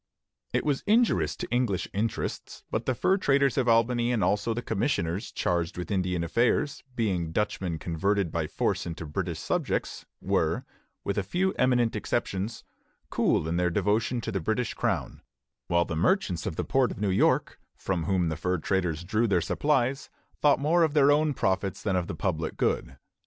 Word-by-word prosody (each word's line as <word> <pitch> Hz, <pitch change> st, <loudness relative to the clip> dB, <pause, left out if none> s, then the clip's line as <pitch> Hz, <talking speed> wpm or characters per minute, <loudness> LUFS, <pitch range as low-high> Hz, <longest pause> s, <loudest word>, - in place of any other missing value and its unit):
It -, -, 0 dB
was 145 Hz, -3 st, +1 dB
injurious 230 Hz, +2 st, +3 dB
to -, -, -5 dB
English 120 Hz, -7 st, 0 dB
interests; 110 Hz, +3 st, -3 dB
but 110 Hz, +1 st, -2 dB
the 130 Hz, -, +1 dB
fur 190 Hz, +10 st, +2 dB
traders 140 Hz, -, +2 dB
of 130 Hz, -2 st, +1 dB
Albany 120 Hz, +1 st, +3 dB
and 115 Hz, -4 st, +1 dB
also 105 Hz, +3 st, +1 dB
the 120 Hz, +2 st, -3 dB
commissioners 100 Hz, -, -1 dB
charged 85 Hz, -1 st, -1 dB
with 90 Hz, 0 st, -5 dB
Indian 90 Hz, -3 st, 0 dB
affairs, 120 Hz, -, +1 dB
being 95 Hz, -8 st, -1 dB
Dutchmen 95 Hz, -3 st, -1 dB
converted 90 Hz, +3 st, 0 dB
by 80 Hz, -2 st, -1 dB
force -, -, -1 dB
into 85 Hz, -1 st, -5 dB
British 75 Hz, -, -3 dB
subjects, -, -, -2 dB
were, -, -, 0 dB, 0.4 s
with 100 Hz, +1 st, -1 dB
a -, -, -1 dB
few 185 Hz, -, 0 dB
eminent 125 Hz, -3 st, +2 dB
exceptions, 105 Hz, -1 st, -2 dB, 0.5 s
cool 80 Hz, -, +1 dB
in 85 Hz, +1 st, -1 dB
their 90 Hz, 0 st, +2 dB
devotion 110 Hz, +7 st, 0 dB
to 110 Hz, -, -4 dB
the 95 Hz, -, -1 dB
British 110 Hz, +7 st, -1 dB
Crown; -, -, -2 dB, 0.5 s
while 85 Hz, 0 st, +2 dB
the 80 Hz, -, -4 dB
merchants 90 Hz, -, +1 dB
of -, -, -3 dB
the -, -, -2 dB
port 130 Hz, -2 st, +2 dB
of -, -, -7 dB
New 105 Hz, -2 st, +1 dB
York, 95 Hz, -, +2 dB, 0.2 s
from 90 Hz, -4 st, -2 dB
whom 90 Hz, -2 st, +1 dB
the 80 Hz, -, -2 dB
fur 90 Hz, +3 st, -1 dB
traders 90 Hz, -2 st, -1 dB
drew 110 Hz, +6 st, +1 dB
their 95 Hz, -4 st, +3 dB
supplies, 135 Hz, -, 0 dB, 0.3 s
thought 145 Hz, -2 st, +5 dB
more 160 Hz, +5 st, +3 dB
of 160 Hz, -2 st, +2 dB
their 145 Hz, -1 st, +6 dB
own 150 Hz, -1 st, +2 dB
profits 95 Hz, -2 st, -1 dB
than 100 Hz, -3 st, 0 dB
of 90 Hz, -2 st, 0 dB
the -, -, -4 dB
public 80 Hz, -3 st, -2 dB
good. 65 Hz, -, -1 dB
100 Hz, 180 wpm, -27 LUFS, 90-125 Hz, 0.5 s, their